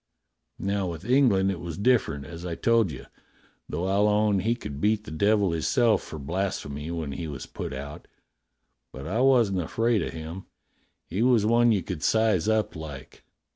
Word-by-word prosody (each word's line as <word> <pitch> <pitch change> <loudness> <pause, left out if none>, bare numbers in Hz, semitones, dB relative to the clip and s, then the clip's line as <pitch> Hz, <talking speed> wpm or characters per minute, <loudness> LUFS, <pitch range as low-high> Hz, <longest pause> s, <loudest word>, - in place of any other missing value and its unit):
Now 100 -1 -1
with 85 +1 -6
Eng 130 +2 +4
land 95 -1 +2
it 95 - -5
was 85 -1 -6
different, 100 - +1
as 85 +3 -9
I 85 -2 -4
told 115 +1 +2
you, 65 - -9 0.6
though 85 +4 -2
I'll 100 +2 +2
own 105 -1 +2
he 115 +5 +1
could 70 - -7
beat 105 0 +2
the 80 - -10
devil 100 +3 +2
hisself 110 - +2
for 80 - -8
blasphemy 75 -2 -3
when 80 -4 -4
he 80 +4 -5
was 70 -2 -6
put - - -6
out. 70 +2 -8 0.8
But 65 +2 -9
I 105 +9 -1
wasn't 120 -8 +4
afraid 115 +6 +1
o' - - -2
him; 80 +3 -8 0.6
he 95 +6 -3
was 120 -4 +4
one 120 +1 +4
you 100 -4 +1
could 90 -5 -5
size 110 -1 +2
up 110 -1 0
like. 75 -4 -9
95 Hz, 180 wpm, -26 LUFS, 80-110 Hz, 0.8 s, Eng